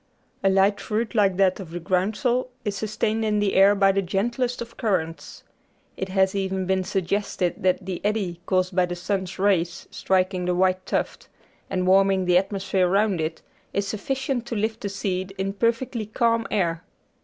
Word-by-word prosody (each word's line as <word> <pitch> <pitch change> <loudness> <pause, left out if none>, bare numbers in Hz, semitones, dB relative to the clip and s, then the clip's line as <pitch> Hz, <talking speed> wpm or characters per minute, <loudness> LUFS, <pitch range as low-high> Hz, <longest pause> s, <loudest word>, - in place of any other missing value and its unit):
A 195 - +4
light 195 +1 +3
fruit 220 +2 -2
like 200 -5 +3
that 190 -1 +3
of 185 -4 -8
the 175 +1 -5
groundsel 215 +8 0 0.2
is 205 -1 -1
sustained 215 +2 -1
in 210 -1 +1
the 205 -1 +1
air 195 +2 +6
by 195 -1 +4
the 195 +1 +1
gentlest 235 +7 -1
of 235 0 -7
currents. 180 -8 -2 0.5
It 190 - -4
has 190 0 +2
even 190 -1 -1
been 190 0 +1
suggested 195 0 -1
that 185 0 +1
the 185 -2 -4
eddy 200 -5 -1
caused 185 -1 +1
by 180 -1 +3
the 175 - -4
sun's 185 +1 -3
rays 180 -3 +1
striking 185 -1 0
the 180 0 +1
white 185 0 +1
tuft, - - -2 0.4
and 185 -1 -1
warming 190 0 +4
the 180 0 +5
atmosphere 190 -1 0
round 195 -2 +2
it, 160 +1 -4 0.3
is 200 0 -1
sufficient 260 +3 -2
to 235 - -3
lift 220 +1 -2
the 200 - -3
seed 195 -1 -3
in 195 +1 -2
perfectly 230 +1 -1
calm 230 +1 +1
air. 170 -5 0
195 Hz, 180 wpm, -24 LUFS, 185-215 Hz, 0.5 s, air